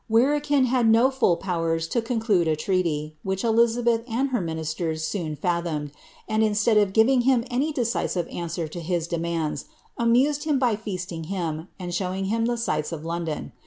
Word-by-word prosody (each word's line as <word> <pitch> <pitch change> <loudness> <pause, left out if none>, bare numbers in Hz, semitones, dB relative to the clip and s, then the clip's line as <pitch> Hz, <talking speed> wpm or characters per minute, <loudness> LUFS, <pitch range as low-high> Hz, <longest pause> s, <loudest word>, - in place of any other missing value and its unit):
Verekin 285 +4 +3
had 245 -2 +2
no 235 +4 +5
full 245 -10 +2
powers 165 -3 -1
to 235 - 0
conclude 225 -7 +1
a 155 - +2
treaty, 155 -3 -1
which 190 0 -2
Eiiabeth 230 0 +2
and 260 +5 0
her 245 -5 0
ministers 160 -1 -3
soon 160 -3 -3
fathomed; 170 -3 -2 0.4
and 215 0 +1
instead 215 +1 +2
of 205 -2 +4
giving 240 +5 +4
him 245 -1 +2
any 275 +6 0
decisive 230 - -1
answer 170 -1 -4
to 165 +3 -7
his 170 0 -1
demands, 170 -2 -2 0.3
amused 265 +6 +3
him 300 -3 +2
by 245 -4 +2
feasting 180 -6 -5
him, 165 -3 -3
and 175 -1 -5
showing 185 +1 -2
him 230 0 +1
the 240 0 0
sights 155 -10 -1
of 160 -1 -6
London. 165 - -3
190 Hz, 170 wpm, -25 LUFS, 165-235 Hz, 0.4 s, no